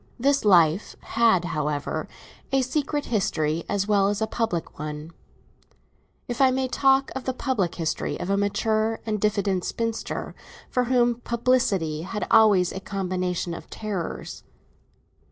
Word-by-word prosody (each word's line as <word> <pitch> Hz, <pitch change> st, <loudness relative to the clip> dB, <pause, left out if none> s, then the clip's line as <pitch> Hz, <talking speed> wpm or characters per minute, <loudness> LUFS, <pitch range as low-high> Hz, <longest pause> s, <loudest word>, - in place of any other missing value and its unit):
This 280 Hz, +3 st, +2 dB
life 175 Hz, -2 st, +4 dB
had, 225 Hz, -6 st, +2 dB
however, 150 Hz, -3 st, -2 dB, 0.4 s
a 270 Hz, -1 st, +3 dB
secret 290 Hz, +2 st, -1 dB
history 170 Hz, -8 st, 0 dB
as 200 Hz, 0 st, 0 dB
well 200 Hz, -2 st, +3 dB
as 205 Hz, 0 st, 0 dB
a 220 Hz, -, +1 dB
public 220 Hz, -10 st, -3 dB
one—if 155 Hz, -, -10 dB
I 265 Hz, -, +7 dB
may 260 Hz, 0 st, 0 dB
talk 270 Hz, +1 st, +3 dB
of 265 Hz, -, -5 dB
the 260 Hz, -, -2 dB
public 230 Hz, -11 st, -1 dB
history 165 Hz, -3 st, -2 dB
of 185 Hz, -, -3 dB
a -, -, +3 dB
mature 215 Hz, +2 st, 0 dB
and 215 Hz, -2 st, -2 dB
diffident 200 Hz, -3 st, +1 dB
spinster 230 Hz, -1 st, -3 dB, 0.4 s
for 250 Hz, -1 st, +1 dB
whom 240 Hz, -1 st, +2 dB
publicity 225 Hz, -10 st, +1 dB
had 210 Hz, +5 st, -4 dB
always 200 Hz, -5 st, +5 dB
a 190 Hz, -, -5 dB
combination 185 Hz, -3 st, -2 dB
of 170 Hz, -, -9 dB
terrors. 205 Hz, -6 st, -5 dB
210 Hz, 135 wpm, -25 LUFS, 180-240 Hz, 0.4 s, I